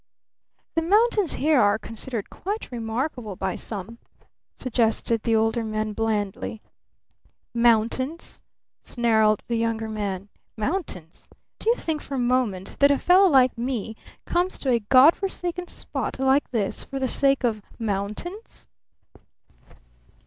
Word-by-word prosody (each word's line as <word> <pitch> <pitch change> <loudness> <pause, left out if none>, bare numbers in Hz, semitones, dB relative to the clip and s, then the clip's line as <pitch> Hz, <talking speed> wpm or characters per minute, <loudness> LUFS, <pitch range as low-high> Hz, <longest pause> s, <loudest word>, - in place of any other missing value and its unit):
"The 330 - +1
mountains 415 +1 +3
here 300 -2 +3
are 205 0 +4
considered 225 0 -5
quite 410 -2 -5
remarkable 235 -1 -3
by 190 0 -2
some," 220 +2 -6 0.6
suggested 230 -2 0
the 230 0 +1
Older 225 +1 +1
Man 215 -1 -2
blandly. 215 -1 -2 0.9
"Mountains?" 240 +6 +1 0.4
snarled 220 -3 +2
the 235 - 0
Younger 225 -1 -1
Man. 200 -3 -3 0.3
"Mountains? 215 - -4 0.3
Do 445 - 0
you 470 - +5
think 320 -9 -3
for 275 - -6
a - - -2
moment 240 -7 0
that 280 - +6
a 285 - +4
fellow 370 +5 +5
like 260 -4 +5
me 230 -2 -3 0.3
comes 355 +2 0
to 265 - -1
a 235 - +3
God 255 +8 +6
forsaken 360 -2 -4
spot - - -5
like 265 +2 +2
this 215 -5 -2
for 275 - -6
the 265 -1 0
sake 275 0 +2
of 220 -3 0 0.2
mountains?" 215 - -5
235 Hz, 130 wpm, -24 LUFS, 215-285 Hz, 0.9 s, that